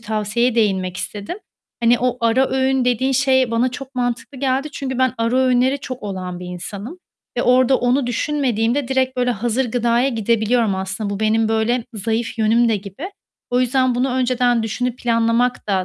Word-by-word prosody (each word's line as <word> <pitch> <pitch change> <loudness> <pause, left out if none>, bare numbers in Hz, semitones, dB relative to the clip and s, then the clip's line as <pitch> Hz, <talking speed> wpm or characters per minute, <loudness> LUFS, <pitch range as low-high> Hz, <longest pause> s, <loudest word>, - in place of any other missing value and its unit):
tavsiyeye 220 +2 0
değinmek 190 -5 0
istedim. 205 - -5 0.4
Hani, 235 +1 +4
o 250 0 0
ara 235 +3 +2
öğün 265 -1 +1
dediğin 250 +2 +1
şey 260 -2 +2
bana 235 +2 +1
çok 270 +1 -9
mantıklı 245 +2 -3
geldi 270 +2 0
çünkü 260 -3 -4
ben 260 -1 +2
ara 230 +2 +1
öğünleri 260 +1 +2
çok 255 -1 -7
olan 185 -3 -5
bir 180 - -7
insanım. 200 - -7 0.4
Ve 245 - +1
orada 255 +1 +4
onu 250 +2 +1
düşünmediğimde 245 -1 0
direkt, 260 -1 0
böyle, 250 0 +1
hazır 240 +2 -1
gıdaya 240 +2 +2
gidebiliyorum 230 -2 +1
aslında. 190 +2 -3
Bu 200 - -4
benim, 220 0 +2
böyle, 225 +2 0
zayıf 225 +3 -2
yönüm 225 +2 +3
de 225 - +2
gibi. 205 - -8 0.4
O 250 +1 +2
yüzden 255 0 +2
bunu 250 +2 0
önceden 250 -2 +1
düşünüp 245 +3 -2
planlamak 230 +1 +1
da 190 -2 +1
240 Hz, 170 wpm, -20 LUFS, 220-255 Hz, 0.4 s, Hani